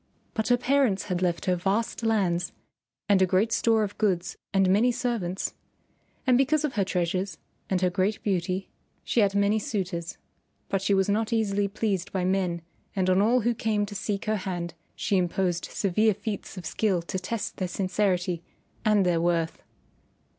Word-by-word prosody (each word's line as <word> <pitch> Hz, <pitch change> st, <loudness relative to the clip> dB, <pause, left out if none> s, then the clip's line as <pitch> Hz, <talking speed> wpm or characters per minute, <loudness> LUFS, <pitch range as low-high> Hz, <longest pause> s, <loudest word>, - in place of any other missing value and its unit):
But 220 Hz, -1 st, -1 dB
her 245 Hz, -, +4 dB
parents 250 Hz, -5 st, +2 dB
had 180 Hz, -1 st, -1 dB
left 175 Hz, -2 st, 0 dB
her 185 Hz, -, +2 dB
vast 195 Hz, +7 st, -1 dB
lands 190 Hz, -6 st, +1 dB, 0.5 s
and 200 Hz, -2 st, +4 dB
a 190 Hz, -, +5 dB
great 195 Hz, +5 st, +2 dB
store 225 Hz, -1 st, +3 dB
of 205 Hz, -1 st, -5 dB
goods 185 Hz, -5 st, +1 dB, 0.2 s
and 195 Hz, -1 st, +3 dB
many 210 Hz, +7 st, +4 dB
servants, 230 Hz, -7 st, -2 dB, 0.7 s
and 255 Hz, -2 st, +4 dB
because 300 Hz, +3 st, +3 dB
of 280 Hz, -, -2 dB
her 205 Hz, -, +2 dB
treasures 185 Hz, +1 st, -1 dB, 0.3 s
and 185 Hz, -1 st, +1 dB
her 180 Hz, -1 st, +2 dB
great 195 Hz, +3 st, 0 dB
beauty 185 Hz, -1 st, -1 dB, 0.4 s
she -, -, 0 dB
had 200 Hz, -2 st, +3 dB
many 200 Hz, +2 st, +3 dB
suitors. 190 Hz, -, -3 dB, 0.5 s
But 195 Hz, -, 0 dB
she 195 Hz, +1 st, +2 dB
was 190 Hz, 0 st, +2 dB
not 215 Hz, +3 st, 0 dB
easily 205 Hz, -3 st, +1 dB
pleased 200 Hz, -2 st, -2 dB
by 185 Hz, -2 st, -1 dB
men 180 Hz, -3 st, 0 dB, 0.3 s
and 185 Hz, -1 st, +2 dB
on 185 Hz, +1 st, +4 dB
all 240 Hz, +4 st, +4 dB
who 240 Hz, +2 st, +2 dB
came 215 Hz, -2 st, 0 dB
to 205 Hz, -, -9 dB
seek 205 Hz, 0 st, -3 dB
her 215 Hz, 0 st, +1 dB
hand 175 Hz, -3 st, -4 dB, 0.2 s
she 200 Hz, -, +1 dB
imposed 180 Hz, -1 st, 0 dB
severe 215 Hz, +2 st, +1 dB
feats 205 Hz, -1 st, -5 dB
of 180 Hz, -, -7 dB
skill 185 Hz, +1 st, 0 dB
to 185 Hz, +2 st, -3 dB
test 205 Hz, +4 st, -4 dB
their 185 Hz, -, -1 dB
sincerity 185 Hz, -2 st, 0 dB, 0.4 s
and 210 Hz, -3 st, +4 dB
their 170 Hz, -2 st, +2 dB
worth. 170 Hz, -1 st, 0 dB
195 Hz, 175 wpm, -27 LUFS, 180-215 Hz, 0.7 s, a